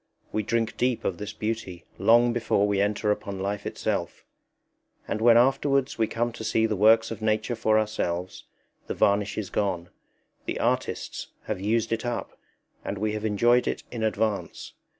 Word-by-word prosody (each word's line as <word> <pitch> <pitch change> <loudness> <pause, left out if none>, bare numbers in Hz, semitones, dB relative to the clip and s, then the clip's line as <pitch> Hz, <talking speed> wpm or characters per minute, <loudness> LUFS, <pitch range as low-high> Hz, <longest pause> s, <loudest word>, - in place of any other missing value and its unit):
We 110 - 0
drink 115 +1 -1
deep 125 -1 0
of 90 - -1
this 105 0 -5
beauty 105 -5 -4
long 120 +1 +5
before 110 -3 +1
we 100 -1 +1
enter 105 +1 +1
upon 100 -2 -3
life 100 +1 -3
itself; - - -3 0.8
and 110 - -2
when 115 0 +7
afterwards 135 +1 +2
we 110 - +3
come 120 +2 -1
to 115 - -8
see 110 0 +2
the 110 -1 0
works 110 +3 +5
of 115 - -6
Nature 110 +2 0
for 110 -1 +2
ourselves, 95 -5 -2 0.4
the - - -3
varnish 100 0 +2
is 105 -3 -4
gone: 90 -4 -1 0.6
the - - -2
artists - - -1 0.2
have 95 - -4
used 110 +2 0
it 115 - -2
up 120 -1 -4 0.5
and 100 - -4
we 105 +2 -1
have 110 0 -3
enjoyed 120 +4 +3
it - - -2
in 120 - -5
advance. 110 -1 -2
110 Hz, 170 wpm, -26 LUFS, 100-115 Hz, 0.8 s, when